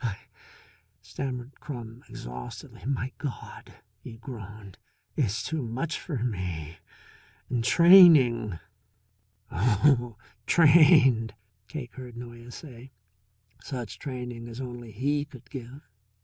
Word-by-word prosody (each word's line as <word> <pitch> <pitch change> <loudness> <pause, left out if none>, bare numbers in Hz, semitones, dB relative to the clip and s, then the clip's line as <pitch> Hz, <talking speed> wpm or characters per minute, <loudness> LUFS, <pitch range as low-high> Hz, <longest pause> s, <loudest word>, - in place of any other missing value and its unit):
"I - - +1
I 100 -3 -4 0.6
" - - -43
stammered 130 -1 -6
Crum 120 -5 -8
exhaustedly. 60 0 -9
"My 130 -1 -1
God," 140 -5 -7 0.2
he 115 - -10
groaned, 110 -5 -10 0.4
"it's 110 -6 0
too 160 -2 -2
much 130 +8 -3
for 135 -9 -4
me. 90 -8 -4 0.7
And 120 -2 0
training!" 135 - +7 0.9
"Oh, 120 - +2 0.3
trained," 145 - +6 0.3
Cake 125 -4 -7
heard 125 -2 -10
Noyes 120 0 -10
say. 130 -4 -12 0.7
"Such 125 -4 -6
training 125 -4 -6
as 120 +1 -9
only 120 -3 -7
he 145 +7 0
could 130 -4 -14
give. 135 +1 -8
120 Hz, 110 wpm, -27 LUFS, 115-140 Hz, 0.9 s, training